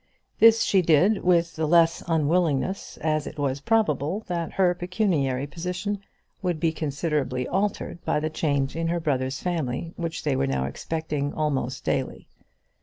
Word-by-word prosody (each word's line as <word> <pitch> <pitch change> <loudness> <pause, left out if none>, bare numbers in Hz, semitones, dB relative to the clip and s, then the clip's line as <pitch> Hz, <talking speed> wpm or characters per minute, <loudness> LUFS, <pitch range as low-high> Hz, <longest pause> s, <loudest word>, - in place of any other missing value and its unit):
This 225 0 +7
she 195 - +3
did 180 +6 +3
with 170 -2 +2
the 160 0 -1
less 165 0 +4
unwillingness 165 +2 0
as 155 -1 0
it - - -8
was 140 -1 -1
probable 190 - +1
that 170 -2 -3
her 185 -2 +3
pecuniary 175 - 0
position 180 +7 -4 0.4
would 175 -4 -1
be 165 0 +2
considerably 145 -4 -2
altered 195 -2 -2
by - - +1
the 155 +1 -2
change 140 -3 0
in 165 0 -1
her 170 +1 0
brother's 135 -4 -1
family 165 -2 -2
which 165 -1 -4
they 145 -3 +1
were 70 - +1
now 65 -1 0
expecting 150 - -3
almost 135 -4 -1
daily. - - -2
160 Hz, 155 wpm, -25 LUFS, 140-180 Hz, 0.4 s, This